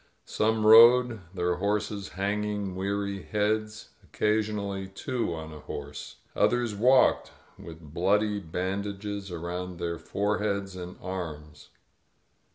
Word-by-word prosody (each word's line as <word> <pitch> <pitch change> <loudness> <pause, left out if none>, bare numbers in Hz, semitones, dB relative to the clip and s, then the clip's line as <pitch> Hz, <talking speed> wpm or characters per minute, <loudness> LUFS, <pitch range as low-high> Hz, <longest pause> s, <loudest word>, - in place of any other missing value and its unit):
Some 110 0 0
rode, 120 +1 +8
their 90 -2 -1
horses 100 0 -2
hanging 100 0 -2
we&ry 100 +1 -2
heads 110 0 -2
— - - -34
occasionally 105 -2 -1
two 115 +3 -3
on 80 -1 -7
a 75 - -9
horse. 75 0 -8 0.2
Others 120 -3 +2
walked, 125 +5 +4 0.3
with 80 -3 -11
bloody 105 +4 +2
bandages 100 +3 -4
around 90 +1 -5
their 85 -1 -3
foreheads 100 -1 -1
and 90 0 -8
arms. 80 -5 -7
100 Hz, 110 wpm, -28 LUFS, 90-105 Hz, 0.3 s, rode